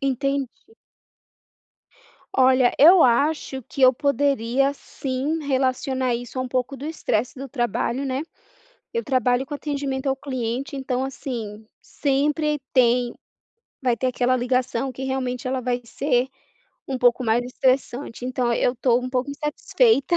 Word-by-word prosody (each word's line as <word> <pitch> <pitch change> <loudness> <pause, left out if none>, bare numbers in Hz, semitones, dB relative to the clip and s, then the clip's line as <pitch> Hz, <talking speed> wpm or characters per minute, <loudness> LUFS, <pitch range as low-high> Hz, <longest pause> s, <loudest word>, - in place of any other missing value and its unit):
Entendi. 275 -1 -1 1.8
Olha, 255 -1 +4
eu 340 +5 +8
acho 265 +1 +2
que 270 - -5
eu 255 0 +8
poderia 275 -1 +1
sim, 275 +4 -3
relacionar 260 -2 0
isso 245 +2 -6
a 255 - +1
um 255 - -5
pouco 255 +2 -2
do 275 - -8
estresse 255 -6 -2
do 275 0 -6
trabalho, 240 +1 -1
né. 265 +1 -2 0.7
Eu 465 - -1
trabalho 255 -1 +1
com 290 - -7
atendimento 280 -2 -3
ao 270 - +2
cliente, 260 -1 -4
então, 265 -1 -2
assim, 225 -5 -6 0.2
sempre 295 +2 0
tem, 245 -1 +3 0.7
vai 245 -2 +2
ter 255 - -1
aquela 255 0 +1
ligação 255 +1 0
que 260 +1 -7
realmente 260 -1 -2
ela 260 0 -1
vai 245 0 -1
ser 255 0 0 0.6
um 265 -2 -2
pouco 245 +1 +3
mais 230 +1 +1
estressante. 255 -1 -1
Então, 250 -1 0
eu 245 +2 +1
tô 245 0 +2
um 255 - -4
pouco 255 +2 -1
insatisfeita 300 - +1
260 Hz, 140 wpm, -23 LUFS, 245-275 Hz, 1.8 s, eu